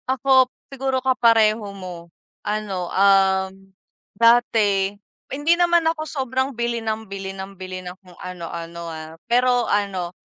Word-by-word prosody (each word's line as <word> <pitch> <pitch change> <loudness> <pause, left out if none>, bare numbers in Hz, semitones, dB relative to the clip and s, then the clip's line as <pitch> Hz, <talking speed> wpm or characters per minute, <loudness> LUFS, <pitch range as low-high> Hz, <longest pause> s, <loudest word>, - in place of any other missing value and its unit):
Ako, 260 0 +4 0.2
siguro 265 0 -1
kapareho 230 -4 +4 0.2
mo 175 -3 -9 0.3
ano, 205 -4 -3
um, 190 -1 +3 0.7
dati 210 -4 +3 0.3
hindi 290 +5 +2
naman 345 -1 +3
ako 325 -1 0
sobrang 260 -1 -1
bili 235 -1 -1
ng 220 0 -3
bili 195 0 -6
ng 195 0 -8
bili 185 0 -7
ng 180 0 -7
kung 180 -2 -17
ano-ano, 170 -1 -7
ah. 160 0 -8 0.2
Pero 245 0 +3
ano, 195 -4 -1
210 Hz, 130 wpm, -22 LUFS, 185-250 Hz, 0.7 s, Ako